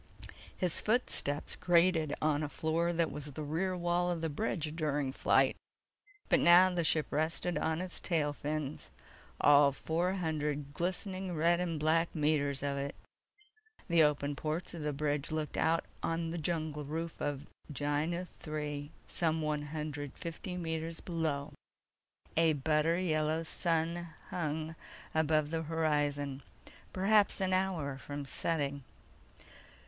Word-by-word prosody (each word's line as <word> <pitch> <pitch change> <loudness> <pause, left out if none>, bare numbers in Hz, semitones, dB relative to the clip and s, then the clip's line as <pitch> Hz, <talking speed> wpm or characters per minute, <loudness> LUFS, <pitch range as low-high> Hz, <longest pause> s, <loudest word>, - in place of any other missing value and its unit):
His 180 -3 +1
footsteps 210 - +1
grated 170 -3 +3
on 150 -1 +2
a 150 - -2
floor 160 +3 0
that 170 -1 +1
was 145 +1 -5
the 155 - -5
rear 180 +5 -1
wall 175 0 +1
of 170 -2 -1
the 160 -2 -1
bridge 155 -3 -2
during 145 -4 0
flight. - - +3 0.7
But - - +4
now 180 +2 +7
the 175 -1 +1
ship 155 -1 +3
rested 160 +3 0
on 160 +1 0
its 185 -1 -5
tail 150 -4 0
fins—all 145 -1 +1
four 170 +6 0
hundred 150 -5 -2
glistening 185 +1 -2
red 170 +2 +3
and 170 -3 -1
black 165 +3 +2
meters 145 -3 +1
of 140 -1 -1
it. 140 0 -3 0.9
The 170 -3 +4
open 145 -1 +2
ports 155 +5 -2
of 170 - -6
the 150 0 -1
bridge 145 0 -1
looked 155 -1 -3
out 165 +1 +2 0.2
on 165 0 -1
the 170 - -3
jungle 155 -2 -2
roof 160 +3 -4
of 145 0 -2 0.3
Gienah 150 +5 -1 0.2
III 150 -1 -3 0.2
some 160 -2 0
one 150 -1 0
hundred 145 -2 -4
fifty 175 +2 -5
meters 165 -1 -3
below. 160 -5 -2 0.8
A 165 -1 +4
butter 155 +3 +2
yellow 155 -2 +1
sun 170 +1 -1 0.2
hung 155 -1 -2 0.4
above 155 -1 +2
the 165 -1 0
horizon, 145 -3 0 0.5
perhaps 200 +3 +3
an 190 -1 +1
hour 170 -8 0
from 145 +1 -6
setting. 140 -1 -1
160 Hz, 135 wpm, -33 LUFS, 145-170 Hz, 0.9 s, now